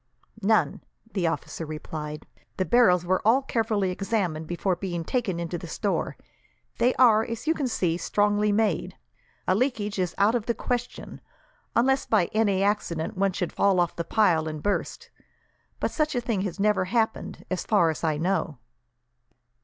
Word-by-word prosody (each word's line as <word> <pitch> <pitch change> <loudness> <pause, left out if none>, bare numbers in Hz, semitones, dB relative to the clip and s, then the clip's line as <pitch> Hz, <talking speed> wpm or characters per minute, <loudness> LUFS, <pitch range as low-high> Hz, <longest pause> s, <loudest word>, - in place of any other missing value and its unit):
"None," 195 -8 +2 0.3
the 185 -4 +1
officer 165 0 -3
replied. 150 -1 -6 0.3
"The 185 - 0
barrels 180 -5 +4
were 185 +1 +1
all 245 +6 +4
carefully 220 -6 0
examined 180 -5 -2
before 175 +2 -1
being 175 -3 -4
taken 200 -3 -1
into 170 0 -3
the 175 - -8
store. 200 +4 -2 0.6
They 245 +2 +3
are, 225 -4 +5
as 230 +2 -6
you 320 - +3
can 290 -5 -2
see, 175 -8 0
strongly 205 +3 +1
made. 200 -4 0 0.5
A - - +4
leakage 210 -3 -1
is 180 -2 -1
out 205 +3 +4
of 235 -3 -1
the 235 - +1
question, 245 -1 -4 0.5
unless 265 +3 +2
by 205 -6 +2
any 205 -3 +2
accident 200 -6 -1
one 195 0 +1
should 180 -1 -3
fall 195 -2 +3
off 175 -1 +1
the 170 - -2
pile 170 -6 +2
and 155 -1 -5
burst; 205 - -2 0.7
but - - -1
such 305 -2 0
a 245 - +1
thing 230 -5 -1
has 195 0 -4
never 210 -2 +2
happened, 220 +3 -1
as 185 - -1
far 185 -7 +3
as 160 - -8
I 155 -2 +1
know." 170 -3 -1
195 Hz, 170 wpm, -26 LUFS, 170-225 Hz, 0.7 s, are